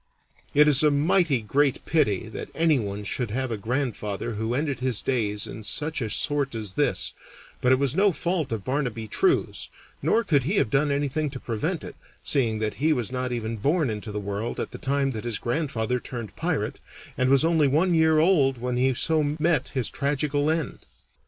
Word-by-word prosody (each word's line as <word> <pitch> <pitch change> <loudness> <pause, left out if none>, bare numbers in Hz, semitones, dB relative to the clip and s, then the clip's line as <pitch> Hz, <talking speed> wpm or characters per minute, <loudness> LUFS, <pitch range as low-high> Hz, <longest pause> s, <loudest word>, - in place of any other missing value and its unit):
It 150 +1 +6
is 145 -2 +6
a 155 - +5
mighty 145 - +2
great 140 +5 +1
pity 110 - +1
that - - -7
anyone 120 -12 +1
should 120 +3 -2
have 130 +3 -2
a - - 0
grandfather 115 -1 -3
who 110 +3 -2
ended 140 -2 -1
his 125 -4 0
days 105 -6 0
in 110 - -8
such 150 +6 -1
a 110 - -2
sort 140 +1 0
as 105 -4 -4
this, - - +1 0.5
but 125 - +3
it 130 - +5
was 140 0 0
no 200 +2 +4
fault 170 -4 -2
of 110 -4 -3
Barnaby 125 -5 -2
True's, 365 - 0 0.3
nor 230 - +2
could 145 - +2
he 180 +8 0
have 115 - +1
done 145 +2 +2
anything 145 +2 0
to 135 -2 -8
prevent 150 - -3
it, - - -8 0.3
seeing 120 -6 +1
that 110 -1 -1
he 155 +1 +4
was 125 -4 -2
not 125 0 -2
even 115 -1 -3
born 145 - +1
into 105 0 -6
the 105 - -3
world 100 +3 -4
at - - -3
the - - -8
time 135 0 0
that 110 -4 -5
his 120 -3 -1
grandfather 125 -3 -1
turned 120 -3 -7
pirate, - - -2 0.4
and 130 0 +1
was 140 +3 +4
only 160 -3 +3
one 165 +7 +2
year 160 -1 +4
old 155 -6 +3
when 125 +1 -2
he 130 +1 +2
so 150 0 +1
met 165 0 +1
his 130 -3 +1
tragical 145 +1 0
end. 160 -3 -1
135 Hz, 195 wpm, -25 LUFS, 115-150 Hz, 0.5 s, It